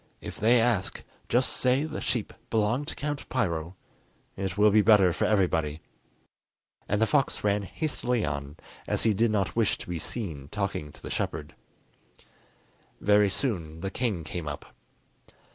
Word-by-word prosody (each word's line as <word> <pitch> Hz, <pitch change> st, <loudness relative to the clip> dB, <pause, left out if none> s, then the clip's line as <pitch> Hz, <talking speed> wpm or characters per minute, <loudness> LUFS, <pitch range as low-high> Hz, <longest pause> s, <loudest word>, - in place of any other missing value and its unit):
If -, -, -8 dB
they 120 Hz, +3 st, +5 dB
ask, 115 Hz, -5 st, 0 dB, 0.3 s
just 125 Hz, +2 st, +3 dB
say 130 Hz, +2 st, +2 dB
the 155 Hz, 0 st, -4 dB
sheep 120 Hz, -4 st, -2 dB, 0.2 s
belong 115 Hz, +5 st, +1 dB
to -, -, -5 dB
Count 145 Hz, -1 st, -4 dB
Piro; 85 Hz, -8 st, -1 dB, 0.6 s
it 95 Hz, -1 st, -3 dB
will 105 Hz, 0 st, +6 dB
be 105 Hz, +1 st, +6 dB
better 100 Hz, -4 st, +6 dB
for -, -, 0 dB
everybody." 80 Hz, -7 st, +1 dB, 1.1 s
And 105 Hz, -, +2 dB
the 110 Hz, -, +4 dB
fox 135 Hz, +2 st, +1 dB
ran 105 Hz, 0 st, +2 dB
hastily 125 Hz, -, -1 dB
on, 70 Hz, 0 st, -4 dB, 0.3 s
as -, -, 0 dB
he 110 Hz, -, +4 dB
did 115 Hz, +3 st, +2 dB
not 100 Hz, -3 st, 0 dB
wish 115 Hz, -3 st, +2 dB
to -, -, -9 dB
be 90 Hz, -2 st, -3 dB
seen 80 Hz, -, -5 dB
talking 100 Hz, -5 st, -3 dB
to -, -, -18 dB
the -, -, -6 dB
shepherd. -, -, -3 dB, 1.5 s
Very 105 Hz, 0 st, +4 dB
soon 85 Hz, -, -2 dB
the 95 Hz, +1 st, -3 dB
king 105 Hz, -9 st, -1 dB
came 80 Hz, 0 st, -5 dB
up. 75 Hz, -1 st, -7 dB
105 Hz, 160 wpm, -28 LUFS, 85-120 Hz, 1.5 s, will